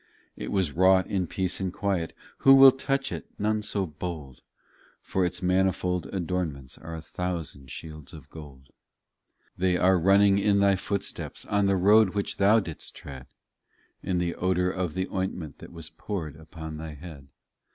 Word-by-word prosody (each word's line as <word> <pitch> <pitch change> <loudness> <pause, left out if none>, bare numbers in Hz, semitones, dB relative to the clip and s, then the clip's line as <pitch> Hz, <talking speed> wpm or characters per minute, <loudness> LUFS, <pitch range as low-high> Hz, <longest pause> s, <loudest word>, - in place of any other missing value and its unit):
It - - -6
was 95 -6 +1
wrought 95 +3 +4
in 95 -3 -1
peace 95 +1 -2
and 95 -2 -2
quiet, 95 -4 -2 0.3
Who 135 0 +7
will 135 0 +10
touch 135 +1 -2
it? - - -6
None 105 +1 0
so 100 -2 -2
bold, 75 -5 -7 0.6
For 95 - -1
its 90 +1 -2
manifold 90 -1 +1
adornments 85 -8 -3
Are 80 +1 -7
a 80 - -8
thousand 85 -8 -5
shields 75 0 -8
of 75 -5 -12
gold. 70 -4 -12 0.9
25 - - -24
They 90 -1 +2
are 95 +1 +4
running 100 +2 +5
in 100 0 +3
Thy 100 -1 +4
footsteps, 100 +1 -4
On 100 -1 +1
the 100 -1 +2
road 105 +1 +5
which 100 - -2
Thou 105 +3 +5
didst 85 -7 -7
tread 65 -2 -10 0.7
In 90 - -1
the 85 -1 0
odour 90 0 0
of 90 -3 -3
the 95 0 -1
ointment 90 -5 -4
That - - -11
was 85 -2 -9
poured 85 -9 -5
upon 80 0 -9
Thy 80 -1 -7
head. 75 -3 -11
90 Hz, 170 wpm, -27 LUFS, 80-100 Hz, 0.9 s, will